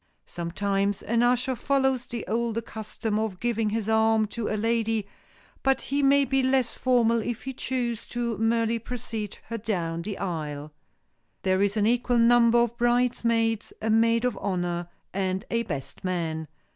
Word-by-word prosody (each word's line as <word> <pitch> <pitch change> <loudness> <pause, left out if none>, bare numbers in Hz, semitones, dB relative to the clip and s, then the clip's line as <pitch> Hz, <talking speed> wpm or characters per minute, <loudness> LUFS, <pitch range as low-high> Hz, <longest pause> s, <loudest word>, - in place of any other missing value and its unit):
Sometimes 195 +3 -1
an 230 +1 +1
usher 250 +2 +2
follows 265 -1 +1
the 235 -2 -5
older 230 0 -1
custom 215 0 -3
of 215 -4 -3
giving 225 -2 0
his 220 0 -2
arm 220 0 +3
to 230 0 -3
a 215 - -1
lady, 225 -1 0 0.6
but 270 -1 +2
he 280 +2 -1
may 280 0 +5
be 270 +1 +1
less 260 -2 +2
formal 235 -3 +2
if 240 0 -4
he 265 - -4
choose 240 -3 -3
and 235 -3 -1
merely 230 0 +2
precede 225 -3 -5
her 230 0 -3
down 170 -6 -2
the 200 +3 -5
aisle. 150 -5 -4 0.7
There 185 0 +2
is 200 +2 +1
an 210 - +3
equal 245 +1 +2
number 235 0 +5
of 235 0 +2
bridesmaids, 235 -2 +1
a 220 - 0
maid 230 +2 +3
of 250 -4 0
honor 175 -3 -2 0.2
and 190 0 -1
a 230 0 +2
best 150 - -6
man. 165 -4 -2
225 Hz, 160 wpm, -26 LUFS, 200-240 Hz, 0.7 s, may